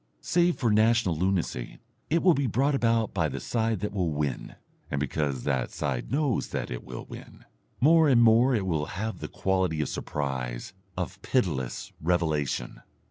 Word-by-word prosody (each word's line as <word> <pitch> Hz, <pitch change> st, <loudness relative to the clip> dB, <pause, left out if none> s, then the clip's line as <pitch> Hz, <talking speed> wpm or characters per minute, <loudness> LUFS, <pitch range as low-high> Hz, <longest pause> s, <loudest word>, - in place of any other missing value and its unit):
Save 175 Hz, 0 st, +2 dB
for 120 Hz, -5 st, +1 dB
national 110 Hz, -4 st, +3 dB
lunacy, 90 Hz, -7 st, -1 dB, 0.3 s
it 165 Hz, +2 st, +2 dB
will 180 Hz, -2 st, +6 dB
be 140 Hz, -3 st, 0 dB
brought 135 Hz, +6 st, +1 dB
about 115 Hz, -4 st, +1 dB
by 85 Hz, -5 st, +1 dB
the 70 Hz, 0 st, -5 dB
side 115 Hz, -4 st, -1 dB
that 105 Hz, -, -2 dB
will 90 Hz, -4 st, 0 dB
win, 75 Hz, -4 st, -3 dB, 0.3 s
and 70 Hz, -, -1 dB
because 70 Hz, -2 st, -1 dB
that 65 Hz, -4 st, 0 dB
side 65 Hz, -4 st, -3 dB
knows 140 Hz, -3 st, +1 dB
that -, -, -4 dB
it -, -, -5 dB
will 65 Hz, -1 st, -8 dB
win. -, -, -12 dB, 0.3 s
More 160 Hz, +2 st, +5 dB
and 125 Hz, -3 st, +5 dB
more 120 Hz, +3 st, +5 dB
it 100 Hz, -4 st, 0 dB
will 80 Hz, -4 st, -1 dB
have 110 Hz, +2 st, -3 dB
the -, -, -5 dB
quality 95 Hz, -4 st, 0 dB
of 75 Hz, -, -1 dB
surprise, 65 Hz, -4 st, -4 dB, 0.2 s
of -, -, -4 dB
pitiless 75 Hz, -, -1 dB
revelation. 80 Hz, -7 st, -1 dB
95 Hz, 170 wpm, -27 LUFS, 75-115 Hz, 0.3 s, will